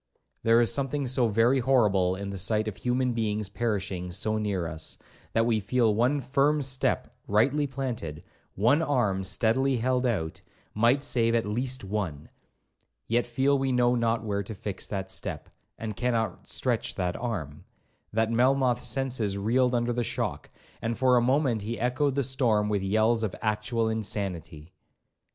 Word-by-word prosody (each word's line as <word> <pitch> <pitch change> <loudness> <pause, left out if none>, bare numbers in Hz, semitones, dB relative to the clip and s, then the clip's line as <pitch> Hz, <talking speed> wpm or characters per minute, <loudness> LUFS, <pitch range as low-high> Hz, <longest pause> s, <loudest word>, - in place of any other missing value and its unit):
There 115 +1 +4
is 120 0 +3
something 140 +2 -1
so 125 -1 +2
very 115 +5 +3
horrible 105 -8 +3
in 100 +1 -5
the 100 - -5
sight 110 +3 +1
of 105 - -3
human 125 +1 0
beings 105 -3 -1
perishing 95 -5 -2
so 110 +5 0
near 100 -5 -1
us, 80 -1 -6 0.4
that 115 0 +3
we 115 -2 +2
feel 110 +2 +2
one 125 +7 +2
firm 140 +2 +2
step 130 -1 -1
rightly 135 +8 +2
planted, 120 - -5 0.3
one 120 - +3
arm 120 -11 +1
steadily 125 +7 +2
held 125 +2 +1
out, 80 -9 -2 0.3
might 120 +6 +3
save 115 -4 +2
at 115 - +1
least 125 +4 -1
one,—yet 95 - -5
feel 135 +3 +2
we 135 0 0
know 125 -1 +3
not 115 -2 +1
where 100 -2 -1
to 100 +2 -7
fix 100 -1 -5
that 95 -2 -4
step, 95 - -3 0.3
and 110 -2 -5
cannot 115 -4 -1
stretch - - -1
that 90 -1 -1
arm, 95 - -4 0.5
that 110 +1 +1
Melmoth's 125 +1 +2
senses 125 -7 -1
reeled 125 +5 +2
under 120 0 0
the 120 0 -1
shock, - - -3 0.3
and 115 0 -2
for 130 0 +4
a 120 - +4
moment 130 -2 +2
he 115 +3 -4
echoed 130 +3 +1
the 140 - +1
storm 115 -5 +1
with 100 -2 0
yells 110 +4 +2
of 110 -4 -2
actual 110 +1 0
insanity. 95 -7 -3
115 Hz, 160 wpm, -27 LUFS, 100-125 Hz, 0.5 s, There